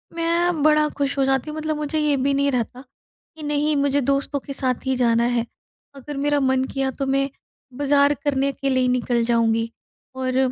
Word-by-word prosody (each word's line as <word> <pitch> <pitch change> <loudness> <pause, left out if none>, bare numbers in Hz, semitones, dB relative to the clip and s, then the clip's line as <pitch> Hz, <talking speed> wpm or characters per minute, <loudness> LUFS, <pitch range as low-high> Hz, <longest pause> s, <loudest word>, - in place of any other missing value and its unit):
मैं 335 -1 +1
बड़ा 305 0 +4
खुश 280 -1 -1
हो 270 - +2
जाती 270 +2 0
हूँ, 305 - -6
मतलब 310 0 -2
मुझे 300 +1 -2
ये 300 -1 +2
भी 275 +2 +1
नहीं 280 0 +1
रहता 245 0 -2 0.5
कि 310 - -10
नहीं, 295 +1 +1
मुझे 285 0 +2
दोस्तों 275 +2 0
के 275 - -8
साथ 260 -2 -1
ही 265 - +1
जाना 235 -2 +2
है। 240 -1 0 0.5
अगर 275 +1 -8
मेरा 290 +1 +1
मन 260 -1 +2
किया 270 -1 0
तो 275 +1 -4
मैं, 275 +1 +1 0.5
बाज़ार 285 0 +3
करने 275 -1 +1
के 275 0 -3
लिए 260 -1 +2
ही 250 - +2
निकल 245 -1 +1
जाऊँगी 230 -1 +1 0.5
और 260 0 -2
275 Hz, 200 wpm, -22 LUFS, 255-290 Hz, 0.5 s, बड़ा